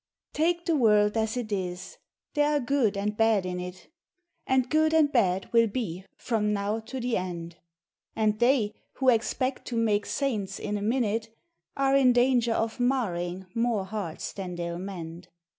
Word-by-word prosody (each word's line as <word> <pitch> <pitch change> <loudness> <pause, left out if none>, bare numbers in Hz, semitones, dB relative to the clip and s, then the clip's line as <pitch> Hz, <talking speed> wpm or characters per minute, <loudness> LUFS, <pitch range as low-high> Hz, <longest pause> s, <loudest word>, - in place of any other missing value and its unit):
Take 340 +2 +1
the 335 - +2
world 210 -5 +4
as 220 +1 0
it 230 -3 -4
is! 180 -2 -4
— - - -62
there 295 0 +2
are - - +3
good 245 -6 +1
and 210 +1 -1
bad 220 -3 +3
in 180 0 -3
it, 180 0 -8 0.6
And 260 -1 +2
good 315 +2 +2
and 305 -2 +4
bad 190 -7 +1
will 230 -1 +5
be 195 -5 -4
from 215 -3 0
now 205 +2 -1
to 240 +4 -7
the 245 -1 0
end; 170 -2 -5 0.6
And 215 -1 +1
they, 240 -4 +3 0.2
who 265 -1 +2
expect 255 +3 0
to 240 - -3
make 210 -2 +1
saints 210 -9 -2
in 210 - -3
a 205 - -3
min 235 +5 +1
ute, 225 +1 -2 0.5
Are 275 0 +3
in 260 -2 +5
danger 245 -1 +3
of 225 +2 -2
marring 190 -8 -1
more 230 -4 0
hearts 195 -5 -5
than 185 -3 -5
they 175 - -4
Ml 170 +1 -4
mend. 175 -2 -7
220 Hz, 180 wpm, -27 LUFS, 190-255 Hz, 0.6 s, will